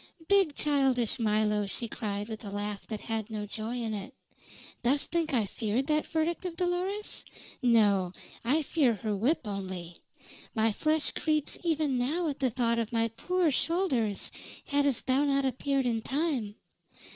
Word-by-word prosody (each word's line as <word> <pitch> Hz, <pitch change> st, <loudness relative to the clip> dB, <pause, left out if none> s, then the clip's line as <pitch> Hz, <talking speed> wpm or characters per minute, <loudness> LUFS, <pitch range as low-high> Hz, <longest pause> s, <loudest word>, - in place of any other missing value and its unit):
"Big, 390 Hz, -7 st, +4 dB
childish 265 Hz, -5 st, +2 dB
Milo!" 210 Hz, -2 st, +2 dB
she 235 Hz, +4 st, -2 dB
cried 205 Hz, -2 st, -3 dB
with 220 Hz, 0 st, -6 dB
a 205 Hz, -, -6 dB
laugh 205 Hz, 0 st, -4 dB
that 215 Hz, -2 st, -5 dB
had 225 Hz, -1 st, -3 dB
no 210 Hz, -2 st, -3 dB
joy 220 Hz, +3 st, -4 dB
in 230 Hz, -2 st, -2 dB
it. 200 Hz, -2 st, -5 dB, 0.7 s
"Dost 270 Hz, +4 st, +1 dB
think 335 Hz, -2 st, +1 dB
I 235 Hz, -6 st, +2 dB
feared 220 Hz, +5 st, -1 dB
that 305 Hz, +1 st, +1 dB
verdict 325 Hz, +2 st, 0 dB
of 360 Hz, -2 st, -4 dB
Dolores? 365 Hz, +4 st, -1 dB, 0.4 s
No. 205 Hz, -7 st, +4 dB, 0.3 s
I 290 Hz, +7 st, +2 dB
fear 270 Hz, -6 st, +2 dB
her 210 Hz, +1 st, -2 dB
whip 245 Hz, +12 st, +2 dB
only. 185 Hz, -4 st, -5 dB, 0.6 s
My 220 Hz, 0 st, +3 dB
flesh 310 Hz, +7 st, +1 dB
creeps 305 Hz, -2 st, -1 dB
even 305 Hz, -6 st, +1 dB
now 315 Hz, +8 st, 0 dB
at 285 Hz, -2 st, -3 dB
thought 240 Hz, -3 st, +1 dB
of 230 Hz, -1 st, -2 dB
my 230 Hz, -1 st, +2 dB
poor 350 Hz, +8 st, +1 dB
shoulders 265 Hz, -, +1 dB, 0.3 s
hadst 285 Hz, -3 st, +2 dB
thou 265 Hz, +2 st, +3 dB
not 275 Hz, -1 st, +2 dB
appeared 270 Hz, +1 st, 0 dB
in 230 Hz, -2 st, +1 dB
time. 265 Hz, -6 st, -1 dB
245 Hz, 155 wpm, -30 LUFS, 215-300 Hz, 0.7 s, Big